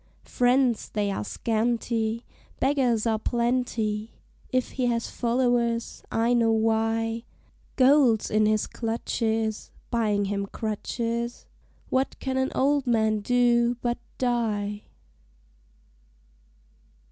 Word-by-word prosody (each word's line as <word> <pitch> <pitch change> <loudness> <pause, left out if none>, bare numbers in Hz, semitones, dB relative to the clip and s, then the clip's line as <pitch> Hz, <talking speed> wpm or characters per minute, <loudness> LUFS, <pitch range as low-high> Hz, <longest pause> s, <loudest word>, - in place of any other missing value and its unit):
Friends 245 -2 +2
they 205 -1 -1
are 105 - -3
scanty, 230 - -1 0.3
Beggars 255 -5 +2
are 220 -1 +1
plenty, 235 -3 -1 0.3
If 255 -1 0
he 255 -2 -1
has 230 -1 -1
followers, 235 -1 0
I 230 +2 +2
know 230 -2 +3
why; 225 +1 0 0.5
Gold's 260 -4 +4
in 215 0 +3
his 215 0 +2
clutches 225 -1 -2 0.2
(Buying 210 -4 +1
him 200 0 -2
crutches!) 230 +3 -3 0.4
What 260 +1 0
can 265 -1 -2
an 265 0 0
old 280 0 +2
man 220 -2 +2
do 240 +1 +3
but 240 0 -1 0.2
die? 210 -4 -1
230 Hz, 100 wpm, -26 LUFS, 220-245 Hz, 0.5 s, Gold's